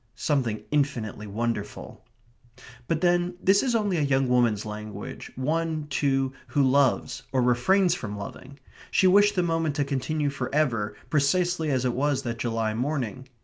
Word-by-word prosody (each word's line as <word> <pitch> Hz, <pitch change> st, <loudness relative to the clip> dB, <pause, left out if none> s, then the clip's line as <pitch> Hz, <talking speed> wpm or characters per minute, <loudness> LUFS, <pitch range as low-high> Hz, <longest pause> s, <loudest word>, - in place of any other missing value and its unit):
Something 120 Hz, -3 st, -1 dB
infinitely 120 Hz, -8 st, -1 dB
wonderful. 105 Hz, 0 st, -4 dB, 0.8 s
But 165 Hz, -1 st, 0 dB
then, 175 Hz, 0 st, +2 dB
this 195 Hz, +2 st, +4 dB
is 250 Hz, -3 st, 0 dB
only 205 Hz, -5 st, +1 dB
a -, -, +1 dB
young 135 Hz, -2 st, +2 dB
woman's 120 Hz, -4 st, +2 dB
language, 105 Hz, 0 st, -7 dB
one, 155 Hz, +3 st, -1 dB
too, 135 Hz, -1 st, +1 dB
who 145 Hz, -, +1 dB
loves, 135 Hz, 0 st, +2 dB
or 130 Hz, -2 st, +2 dB
refrains 175 Hz, +10 st, +3 dB
from 110 Hz, -11 st, -5 dB
loving. 130 Hz, +7 st, -9 dB, 0.3 s
She -, -, +2 dB
wished 205 Hz, +2 st, +5 dB
the 180 Hz, -, +2 dB
moment 165 Hz, -3 st, 0 dB
to 145 Hz, -, +1 dB
continue 145 Hz, +2 st, -1 dB
for 130 Hz, -2 st, -4 dB
ever 115 Hz, -9 st, 0 dB, 0.2 s
precisely 160 Hz, +2 st, +1 dB
as 130 Hz, -2 st, 0 dB
it 125 Hz, -, +1 dB
was 140 Hz, +1 st, 0 dB
that 115 Hz, -1 st, -4 dB
July 115 Hz, -2 st, -1 dB
morning. 130 Hz, 0 st, -3 dB
135 Hz, 155 wpm, -26 LUFS, 120-160 Hz, 0.8 s, wished